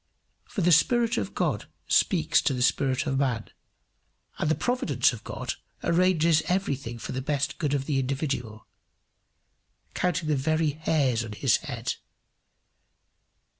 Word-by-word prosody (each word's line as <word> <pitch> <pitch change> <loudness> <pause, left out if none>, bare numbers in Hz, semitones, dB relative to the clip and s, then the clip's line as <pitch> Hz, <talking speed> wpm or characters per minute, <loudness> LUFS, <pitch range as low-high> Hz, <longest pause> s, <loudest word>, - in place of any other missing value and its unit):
For 205 - -4
the 175 0 +4
Spirit 230 +8 +4
of - - -5
God - - -1 0.2
speaks 165 -4 +3
to 135 - 0
the 125 - 0
spirit 135 0 +1
of - - -1
the - - +3
man, 115 -5 -2 0.9
and 155 - 0
the 160 - +3
Providence 250 +1 +1
of - - -9
God - - -4 0.3
arranges 170 -2 +3
everything 140 -11 -1
for - - -6
the 130 - -3
best 140 +2 -2
good 145 -4 0
of 135 -1 -2
the 140 -2 0
individual 130 -5 -3 1.3
counting 170 -3 -1
the 150 - +2
very 155 +3 +1
hairs 145 -5 +1
of 110 -3 -6
his 125 -1 +3
head. - - -4
150 Hz, 145 wpm, -27 LUFS, 130-170 Hz, 1.3 s, the